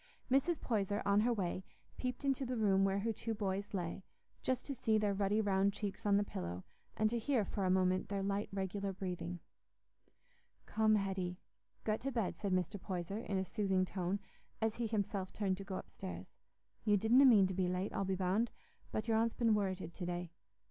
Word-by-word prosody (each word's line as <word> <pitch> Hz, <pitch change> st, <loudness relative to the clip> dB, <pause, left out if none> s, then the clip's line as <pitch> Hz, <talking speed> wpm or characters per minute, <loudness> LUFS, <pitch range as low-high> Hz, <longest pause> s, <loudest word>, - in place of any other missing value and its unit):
Mrs. 275 Hz, +5 st, +3 dB
Poyser, 205 Hz, -3 st, 0 dB
on 200 Hz, 0 st, +4 dB
her 235 Hz, +3 st, +3 dB
way, 190 Hz, -4 st, -1 dB, 0.3 s
peeped 250 Hz, +2 st, -3 dB
into 270 Hz, -1 st, +1 dB
the 250 Hz, -1 st, -2 dB
room 195 Hz, -3 st, +4 dB
where 195 Hz, 0 st, +2 dB
her 225 Hz, +2 st, 0 dB
two 225 Hz, +1 st, -3 dB
boys 200 Hz, 0 st, -2 dB
lay; 180 Hz, -1 st, -3 dB, 0.4 s
just 255 Hz, -1 st, -1 dB
to 280 Hz, -, -3 dB
see 225 Hz, -4 st, +2 dB
their 210 Hz, -1 st, +2 dB
ruddy 200 Hz, +2 st, +1 dB
round 200 Hz, -1 st, +2 dB
cheeks 205 Hz, 0 st, -4 dB
on 200 Hz, -1 st, +5 dB
the 205 Hz, -, +3 dB
pillow, 90 Hz, -, -5 dB, 0.3 s
and 215 Hz, -, +4 dB
to 235 Hz, -, 0 dB
hear 235 Hz, -3 st, +1 dB
for 195 Hz, +1 st, -2 dB
a -, -, +2 dB
moment 185 Hz, 0 st, +2 dB
their 200 Hz, -1 st, -1 dB
light 200 Hz, +1 st, -1 dB
regular 195 Hz, +1 st, -2 dB
breathing. 180 Hz, -2 st, -4 dB, 1.2 s
"Come, 220 Hz, -1 st, +3 dB
Hetty, 190 Hz, -3 st, -1 dB, 0.5 s
get 215 Hz, 0 st, 0 dB
to 275 Hz, -, -2 dB
bed," 230 Hz, -7 st, -1 dB
said 200 Hz, -, -1 dB
Mr. 185 Hz, +2 st, 0 dB
Poyser, 185 Hz, +2 st, -3 dB
in 205 Hz, -4 st, -2 dB
a 190 Hz, -, +1 dB
soothing 190 Hz, -3 st, +1 dB
tone, 185 Hz, +1 st, -2 dB, 0.4 s
as 220 Hz, -1 st, 0 dB
he 235 Hz, -1 st, 0 dB
himself 200 Hz, -3 st, -1 dB
turned 195 Hz, -3 st, 0 dB
to 195 Hz, -, -6 dB
go 195 Hz, -1 st, -5 dB
upstairs. 185 Hz, 0 st, -7 dB, 0.5 s
"You 210 Hz, -1 st, +4 dB
didna 230 Hz, +7 st, +6 dB
mean 215 Hz, -7 st, +8 dB
to 190 Hz, -, -1 dB
be 185 Hz, 0 st, +1 dB
late, 185 Hz, +2 st, -1 dB
I'll -, -, 0 dB
be 190 Hz, 0 st, 0 dB
bound, 190 Hz, +5 st, +1 dB, 0.4 s
but 215 Hz, +1 st, -2 dB
your 225 Hz, -1 st, +3 dB
aunt's 230 Hz, +1 st, +2 dB
been 230 Hz, -2 st, +3 dB
worrited 190 Hz, -4 st, -1 dB
to 180 Hz, -, -5 dB
day. 175 Hz, -1 st, -3 dB
200 Hz, 200 wpm, -36 LUFS, 190-220 Hz, 1.2 s, mean